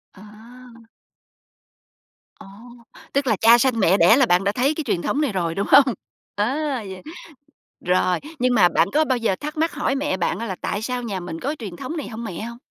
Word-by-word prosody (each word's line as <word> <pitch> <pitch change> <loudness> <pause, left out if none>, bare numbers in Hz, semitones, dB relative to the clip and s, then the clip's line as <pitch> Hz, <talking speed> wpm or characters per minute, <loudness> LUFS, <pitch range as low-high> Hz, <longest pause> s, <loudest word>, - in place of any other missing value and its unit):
À. 190 - -15 2.2
Ồ, - - -13 0.7
tức 280 -1 0
là 220 - +3
cha 230 +4 +6
sanh 245 -2 +1
mẹ 190 0 +4
đẻ 225 - +6
là 270 - +4
bạn 180 -3 +2
đã 200 - +1
thấy 265 +7 +1
cái 315 - -3
truyền 210 -10 -1
thống 295 - -1
này 280 -7 0
rồi, 170 -4 -2
đúng 200 - -2
hông? 270 -4 +6 0.4
Ờ, 215 +6 0 0.3
vậy 190 -1 -9 0.8
rồi, 180 0 +1 0.2
nhưng 250 0 +2
mà 185 -6 +5
bạn 165 - +2
có 310 +1 +3
bao 260 -3 0
giờ 230 -5 0
thắc 300 - -7
mắc 325 +1 0
hỏi 275 - -1
mẹ 270 -9 -1
bạn 175 - -1
á 230 - -4
là 190 - -4
"Tại 205 - -3
sao 250 +2 -3
nhà 200 -5 -4
mình 165 -2 -7
có 285 - -3
truyền 200 -6 -7
thống 260 - -6
này 295 - -5
hông 230 0 -7
mẹ?" 180 -5 -6
hông? 235 +1 -7
230 Hz, 215 wpm, -22 LUFS, 190-265 Hz, 2.2 s, cha